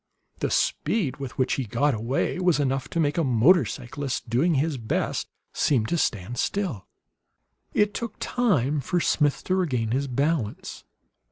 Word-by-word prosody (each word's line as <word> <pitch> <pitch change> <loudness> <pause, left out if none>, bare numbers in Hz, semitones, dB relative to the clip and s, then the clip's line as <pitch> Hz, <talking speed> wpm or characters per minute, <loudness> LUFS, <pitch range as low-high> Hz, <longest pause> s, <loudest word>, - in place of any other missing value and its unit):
The - - 0
speed 180 - 0
with 135 -3 -7
which 130 - +1
he 135 - -1
"got 140 +7 +1
away" 120 +10 -1
was 180 -4 +3
enough 135 -1 0
to 170 - -2
make 150 +1 +1
a - - +2
motorcyclist, 135 -1 +1
doing 140 +9 +2
his 140 0 0
best, 110 -2 -1 0.3
seem 125 -7 +2
to 170 - -1
stand 115 - -1
still. 180 - -2 0.9
It 210 -1 +3
took 235 -3 -4
time 155 - +1
for 175 +7 0
Smith 150 -3 +1
to 185 - -1
regain 125 -12 0
his 140 +3 0
balance. 135 -3 -2
140 Hz, 155 wpm, -25 LUFS, 125-170 Hz, 0.9 s, was